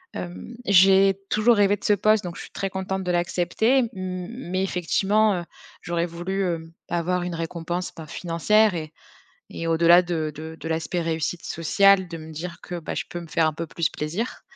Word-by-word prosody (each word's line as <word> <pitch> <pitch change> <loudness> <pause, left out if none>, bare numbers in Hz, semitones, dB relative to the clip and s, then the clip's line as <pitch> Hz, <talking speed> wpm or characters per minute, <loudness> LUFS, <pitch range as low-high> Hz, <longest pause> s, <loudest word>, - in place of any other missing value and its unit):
hem, 180 +7 -7
j'ai 195 0 +5
toujours 225 +3 +4
rêvé 205 0 +4
de - - -21
ce 210 - +5
poste, 215 +1 +3
donc 175 -1 -6
je - - -7
suis - - -12
très 195 -1 -3
contente 190 0 -3
de 180 - -1
l'accepter, 175 +8 +1
m 235 -3 0
mais 185 +1 -4
effectivement, 195 +3 +2
heu, 170 - -10 0.4
j'aurais 170 -1 -1
voulu, 175 +3 -3
heu, 165 -2 -3 0.2
avoir 175 +1 0
une 175 0 -4
récompense, 170 +2 -4
ben, 160 - -8
financière 185 +6 +2
et 155 -2 -5 0.6
et 165 - -4
au-delà 170 +2 +6
de 160 -3 -2
de 160 +1 -7
de 160 - -6
l'aspect 165 +2 -1
réussite 165 +1 -2
sociale, 190 +3 +3
de 165 -1 -7
me 160 0 -10
dire 170 +2 -6
que, 175 -1 -5
bah, 165 - -5
je - - -2
peux 175 - -5
me 170 - -10
faire 160 0 +2
un 155 - -1
peu 165 +1 -5
plus 165 0 -1
plaisir, 170 +11 -4
175 Hz, 200 wpm, -24 LUFS, 165-195 Hz, 0.6 s, au-delà